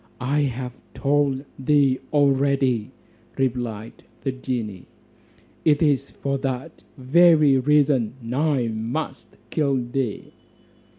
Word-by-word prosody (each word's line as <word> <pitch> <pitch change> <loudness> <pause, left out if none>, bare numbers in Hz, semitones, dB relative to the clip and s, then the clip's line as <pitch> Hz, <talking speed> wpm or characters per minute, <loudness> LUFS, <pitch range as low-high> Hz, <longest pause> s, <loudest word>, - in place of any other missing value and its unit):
"I 135 +4 0
have 130 -3 -2 0.2
told 140 -1 +1
thee 135 -1 +3
already," 135 -5 +2 0.5
replied 120 -4 -3 0.2
the 135 - -1
genie, 120 -7 -5 0.8
"it 150 0 +3
is 140 -3 +1
for 140 0 -3
that 130 -1 -4 0.2
very 150 0 +5
reason 135 -4 +2 0.2
I 140 -3 +1
must 115 +8 -5
kill 140 -4 +1
thee." 120 -2 -3
135 Hz, 100 wpm, -23 LUFS, 125-145 Hz, 0.8 s, very